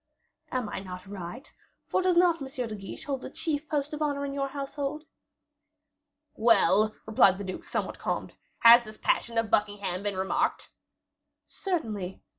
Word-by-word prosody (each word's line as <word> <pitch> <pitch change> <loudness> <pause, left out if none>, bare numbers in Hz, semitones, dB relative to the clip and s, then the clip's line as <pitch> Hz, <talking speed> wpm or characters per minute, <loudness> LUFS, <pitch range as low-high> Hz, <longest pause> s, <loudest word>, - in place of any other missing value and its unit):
"Am 255 -4 -1
I - - -4
not 185 -1 -8
right? 200 +5 -8 0.3
for - - +1
does 365 -1 +2
not 345 -3 +4
M. 270 - -4
de 245 -5 -4
Guiche 195 -2 -8
hold 275 -3 -2
the - - -6
chief 300 +1 -3
post 295 -1 -1
of 300 - -5
honor 285 -2 0
in 275 - -4
your 275 0 -1
household?" 280 +2 -4 1.3
"Well," 215 -2 +4
replied 200 -3 +5
the 200 - -5
duke, 185 -1 -6
somewhat - - -3
calmed, - - -3 0.3
"had 235 +1 +9
this 215 -1 -11
passion 235 -1 0
of 225 -2 +1
Buckingham 205 -3 0
been 200 -2 -2
remarked?" 305 +12 0 0.7
"Certainly." 215 - -3
235 Hz, 160 wpm, -28 LUFS, 205-285 Hz, 1.3 s, had